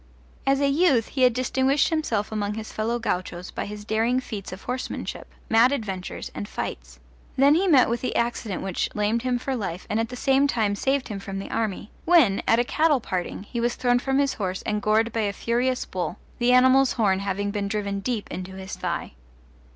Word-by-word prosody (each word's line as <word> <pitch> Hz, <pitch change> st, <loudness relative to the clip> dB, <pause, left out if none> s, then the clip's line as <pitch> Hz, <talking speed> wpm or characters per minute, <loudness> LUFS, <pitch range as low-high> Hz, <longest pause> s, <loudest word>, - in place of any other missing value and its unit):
As 275 Hz, 0 st, +4 dB
a 280 Hz, -, +3 dB
youth 275 Hz, -5 st, +3 dB
he 265 Hz, -, -3 dB
had 250 Hz, -1 st, +6 dB
distinguished 265 Hz, +3 st, +2 dB
himself 240 Hz, -11 st, -1 dB
among 210 Hz, -1 st, -2 dB
his 220 Hz, 0 st, -6 dB
fellow 225 Hz, +2 st, -1 dB
gauchos 180 Hz, -4 st, -3 dB
by -, -, -4 dB
his 210 Hz, 0 st, -8 dB
daring 225 Hz, +4 st, +1 dB
feats 215 Hz, -6 st, -6 dB
of 185 Hz, +2 st, -9 dB
horsemanship, 250 Hz, +1 st, -4 dB, 0.2 s
mad 230 Hz, +3 st, +5 dB
adventures, 195 Hz, -9 st, -4 dB
and 100 Hz, +1 st, -5 dB
fights; -, -, -5 dB, 0.4 s
then 280 Hz, +2 st, +5 dB
he 365 Hz, +5 st, +2 dB
met 280 Hz, -8 st, +6 dB
with 235 Hz, +1 st, -1 dB
the 255 Hz, -, -2 dB
accident 235 Hz, -4 st, -1 dB
which 190 Hz, -2 st, -1 dB
lamed 210 Hz, +2 st, +1 dB
him 250 Hz, 0 st, 0 dB
for 265 Hz, +2 st, -3 dB
life 185 Hz, -6 st, -4 dB
and 215 Hz, -, +1 dB
at 225 Hz, -, -1 dB
the 250 Hz, -, -6 dB
same 270 Hz, +2 st, +3 dB
time 220 Hz, -6 st, +1 dB
saved 270 Hz, +4 st, 0 dB
him 205 Hz, -2 st, -4 dB
from 195 Hz, -1 st, -6 dB
the 195 Hz, -, -6 dB
army; 210 Hz, -1 st, -2 dB
when, 315 Hz, -, +5 dB
at 225 Hz, -, +5 dB
a 240 Hz, -, +3 dB
cattle 305 Hz, +2 st, +2 dB
parting, 185 Hz, -3 st, -4 dB
he 235 Hz, +3 st, -5 dB
was 240 Hz, +1 st, 0 dB
thrown 245 Hz, -1 st, +2 dB
from 270 Hz, +1 st, 0 dB
his 280 Hz, -1 st, +2 dB
horse 185 Hz, -3 st, -3 dB
and 210 Hz, 0 st, -1 dB
gored 220 Hz, +2 st, +2 dB
by 230 Hz, -, -1 dB
a 205 Hz, -1 st, 0 dB
furious 245 Hz, +4 st, 0 dB
bull, 180 Hz, -2 st, -4 dB, 0.2 s
the 240 Hz, 0 st, +3 dB
animal's 260 Hz, +1 st, +5 dB
horn 195 Hz, -5 st, +2 dB
having 200 Hz, +1 st, -2 dB
been 200 Hz, -1 st, -2 dB
driven 200 Hz, -1 st, -2 dB
deep 220 Hz, +1 st, -3 dB
into 185 Hz, +1 st, -6 dB
his 190 Hz, 0 st, -6 dB
thigh. -, -, -3 dB
225 Hz, 210 wpm, -25 LUFS, 200-255 Hz, 0.4 s, had